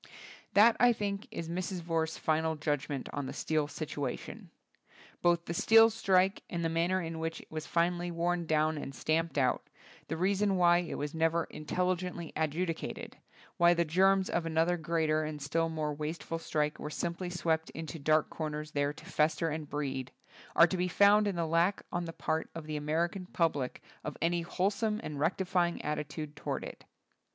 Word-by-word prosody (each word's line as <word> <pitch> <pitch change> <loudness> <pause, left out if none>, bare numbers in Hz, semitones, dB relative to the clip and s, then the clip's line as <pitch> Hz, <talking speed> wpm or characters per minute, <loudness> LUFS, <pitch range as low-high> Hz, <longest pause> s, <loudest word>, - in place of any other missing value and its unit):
That 220 +3 +7
I 245 -1 +6
think, 200 -2 -3
is 165 - -5
Mrs. 180 +2 -3
Vorse's 165 -1 -1
final 160 0 +1
judgment 145 -2 -2
on 145 -2 -3
the - - -5
steel 155 -2 0
situation. 145 -3 -5 0.7
Both 170 -1 +3
the 170 - -3
steel 225 +5 +6
strike 195 -3 +2
and 170 -1 -2
the - - +2
manner 170 +3 +1
in 165 -2 -4
which 165 0 -3
it - - -16
was 155 0 -5
finally 175 +1 +1
worn 170 0 -1
down 155 0 +2
and 135 -1 -6
stamped 160 +2 0
out, 130 -2 +1 0.4
the 160 - -3
reason 195 +2 +2
why 175 -1 +5
it 175 - -4
was 145 0 -4
never 165 +1 +2
intelligently 180 +1 -2
adjudicated, 160 +2 -2 0.4
why 175 0 +6
the 170 0 +2
germs 190 +4 +3
of 170 - 0
another 165 +2 +2
greater 160 -2 0
and 155 -1 -4
still 165 +4 0
more 155 -2 -2
wasteful 155 +2 -4
strike 150 -2 -1
were 150 - -4
simply 170 +3 -3
swept 165 -2 0
into 160 +1 -7
dark 155 +2 +3
comers 150 -1 -4
there 145 0 0
to - - -14
fester 155 +2 +1
and 155 -1 -4
breed, 135 -3 -3 0.4
are 165 - +8
to 185 +2 -2
be 180 +1 +1
found 205 +3 +5
in 200 - -1
the 170 -1 0
lack 170 +5 +1
on 175 0 -2
the 165 - -5
part 160 0 -2
of 165 -2 -6
the 155 0 -4
American 170 +5 -1
public 150 -8 -1 0.2
of 150 - -5
any 170 +1 +1
wholesome 205 +5 0
and 150 -2 -5
rectifying 175 +2 +1
attitude 150 0 -4
toward 150 - -3
it. - - -9
165 Hz, 180 wpm, -31 LUFS, 155-175 Hz, 0.7 s, are